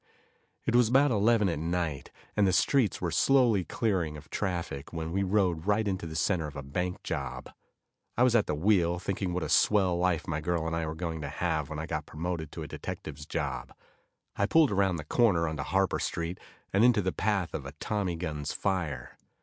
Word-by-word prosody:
It 115 - 0
was 120 -2 +5
about 135 +3 +4
eleven 110 0 +3
at 85 -4 -1
night, 85 -3 -2 0.3
and 105 -2 +4
the - - +3
streets 125 - +2
were - - -1
slowly 125 -8 +4
clearing 90 -9 -1
of 75 +1 -14
traffic, 85 -8 -3
when 80 -1 -4
we 95 +3 0
rode 95 -3 +1
right 105 +1 +2
into 95 -3 -2
the 80 - -7
center 85 -1 +1
of 75 - -10
a 70 - -5
bank 90 +6 -3
job. 65 -2 -4 0.7
I 120 - +5
was 125 -2 +4
at 110 - +3
the 75 - 0
wheel, 85 0 +2
thinking 95 0 -2
what 90 -1 -2
a - - -2
swell 95 -4 +4
life 90 0 0
my 80 -2 -2
girl 85 0 -1
and 80 0 -1
I 85 -1 -1
were 80 - -4
going 80 -1 -4
to 70 - -4
have 80 -2 -1
when 80 - -5
I 80 - -3
got - - -4
promoted 80 -1 -4
to - - -5
a - - -6
detective's 75 +2 -7
job. 70 -7 -3 0.6
I 100 - +1
pulled 160 +1 +5
around 95 -2 +2
the 75 - -5
corner 90 -1 +3
onto 80 -2 -3
Harper 95 +4 +1
street, 85 +2 -3 0.3
and 100 +3 +4
into 120 -4 +5
the 95 - -1
path 95 -4 0
of 70 -3 -4
a 70 - -8
tommy 95 +3 -2
gun's 75 -4 -4
fire. 90 -7 -2
90 Hz, 210 wpm, -29 LUFS, 80-100 Hz, 0.7 s, was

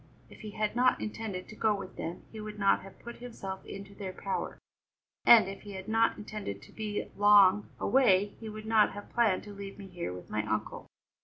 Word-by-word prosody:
If - - -14
he 215 - -7
had 215 +1 -2
not 250 +1 +4
intended 210 -4 -5
to 215 - -10
go 215 -1 +2
with 195 -2 -8
them 170 +2 -5
he 220 - -7
would 210 0 -7
not 200 -1 +3
have 195 0 -13
put 235 0 -9
himself 195 -6 -7
into 195 0 -8
their 195 -2 -6
power, 195 - -3 0.7
and 225 -5 +9
if 195 0 -7
he 205 -1 -9
had 190 +1 -7
not 225 +1 +2
intended 210 - -6
to - - -15
be 210 -2 -4
long 205 -1 +6
away 205 -6 +3
he 225 - -7
would 215 0 -8
not 220 -1 +4
have 205 - -10
planned 225 -6 +2
to 205 - -9
leave 200 0 -8
me 200 - -9
here 175 - -5
with 90 0 -9
my 105 0 0
uncle." 110 0 -3
205 Hz, 215 wpm, -30 LUFS, 190-215 Hz, 0.7 s, and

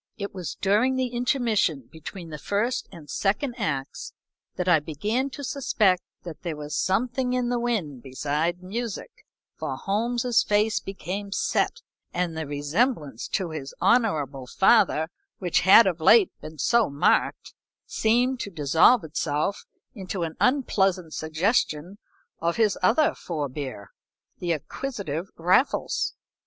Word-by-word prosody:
It 200 -1 -5
was 180 -6 -5
during 215 +7 +2
the 260 -1 0
intermission 235 - 0
between 165 +2 -9
the 150 - -6
first 230 - -1
and 155 -3 -12
second 210 - -1
acts 140 -10 -3 0.4
that 180 - -3
I 175 -3 +6
began 210 - -2
to 285 +1 -8
suspect 215 -9 +1 0.2
that 170 -3 -9
there 170 -3 -4
was 150 0 -6
something 250 +6 0
in 250 -1 0
the 245 -1 0
wind 195 - -2
beside 150 +7 -2
music, 230 - -4 0.5
for - - -3
Holmes's 235 +4 +1
face 210 +1 +2
became 195 +2 -6
set, - - 0 0.3
and 175 -2 -1
the 160 -2 -4
resemblance 145 - -1
to 185 -5 -2
his 140 -3 -7
honorable 155 - +1
father, 190 - +3 0.3
which 180 -3 +1
had 195 +5 +8
of 175 -4 -1
late 205 +4 +6
been 155 0 -9
so 235 - +3
marked, 140 +1 +1 0.3
seemed 245 +3 +1
to 205 - -4
dissolve 165 - +4
itself 155 +4 -2 0.3
into 190 -4 -4
an 160 -1 -4
unpleasant 195 - +1
suggestion 165 +2 -1 0.4
of 170 +1 0
his 215 -4 +2
other 230 +11 +3
forbear, 140 - -5 0.5
the 175 -1 -1
acquisitive 180 - -4
Raffles. 180 - +1
190 Hz, 135 wpm, -25 LUFS, 155-230 Hz, 0.5 s, had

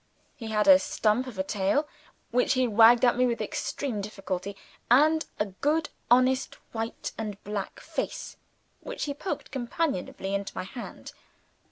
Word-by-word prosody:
He 230 -5 -8
had 210 -1 +1
a 285 -1 +9
stump 260 -5 +1
of 235 -6 -8
a 190 - 0
tail, 200 +10 0 0.4
which 250 +1 +3
he 255 -1 +2
wagged 230 +3 +6
at 245 - +4
me 250 +1 +3
with 235 -1 -1
extreme 245 -8 -3
difficulty, 195 -1 -4 0.3
and 310 +6 +5
a 210 - +2
good 295 +11 0 0.2
honest 255 +2 +3 0.2
white 225 0 -4
and 210 -3 -4
black 205 -1 -4
face - - -4 0.4
which - - -6
he 285 - -2
poked 365 +6 -5
companionably 240 - -2
into 200 0 -3
my - - -2
hand. 235 +6 -8
235 Hz, 155 wpm, -28 LUFS, 205-275 Hz, 0.4 s, a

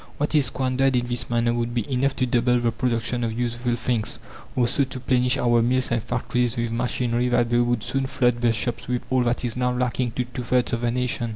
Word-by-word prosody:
What 145 +2 -1
is 145 -4 +3
squandered 130 +1 +1
in 120 -1 +1
this 120 -1 -3
manner 120 0 +1
would 120 0 -2
be 120 -4 -1
enough 135 +1 0
to 130 - +1
double 125 0 +2
the 120 -1 +1
production 120 +1 -1
of 115 -1 -2
useful 120 0 -1
things, 120 -2 -2 0.4
or 125 -2 +2
so 140 +3 +2
to 130 -1 -5
plenish 125 0 +2
our 120 -1 +3
mills 125 +2 +1
and 120 -1 +1
factories 120 +1 -1
with 115 -1 -1
machinery 120 0 0
that 120 -1 +1
they 120 - +3
would 120 -2 +1
soon 135 0 -1
flood 125 -3 +1
the 120 -1 +3
shops 115 +2 -2
with 125 0 -2
all 130 -1 +3
that 120 +1 0
is 115 - -2
now 125 0 +1
lacking 125 -1 -1
to 125 - -1
two 125 +1 -6
thirds 125 +1 +1
of 120 - -1
the 120 - +1
nation. 120 -1 -1
120 Hz, 240 wpm, -24 LUFS, 120-125 Hz, 0.4 s, is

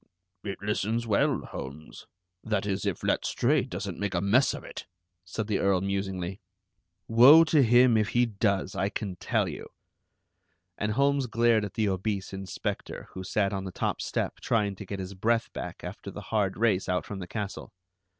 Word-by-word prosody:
"It 100 -2 -4
listens 105 +3 -1
well, 105 -3 +2
Holmes, 75 +4 -9 0.4
that 105 -3 -1
is, 100 0 -1
if 95 - -2
Letstrayed - - +1
doesn't - - -5
make 100 -2 -2
a - - +2
mess 105 +8 +3
of - - -9
it," - - -9 0.4
said 100 +4 -4
the 105 -2 0
Earl 100 -2 +2
musingly. 95 -1 -3 0.7
"Woe 130 +8 +8
to 160 -2 +3
him 120 0 +5
if 110 -1 +1
he 120 0 +3
does, 100 -4 0
I 95 - 0
can 100 -3 -4
tell - - 0
you." - - -7 1.1
And 105 +3 -1
Holmes 140 +1 +2
glared 115 -1 +3
at 100 - -6
the 110 -2 +1
obese 95 0 -2
inspector, 95 -2 -5
who 95 - -7
sat 100 +1 0
on 95 0 -3
the 95 - -5
top - - -2
step - - -2
trying 105 -3 0
to 100 - -9
get 100 - -4
his 95 0 -6
breath 115 +4 0
back - - -7
after - - -7
the - - -8
hard 100 -3 +1
race 105 -4 +1
out 90 0 0
from 100 - -6
the 90 - -6
castle. 105 0 -5
100 Hz, 180 wpm, -28 LUFS, 95-115 Hz, 1.1 s, Woe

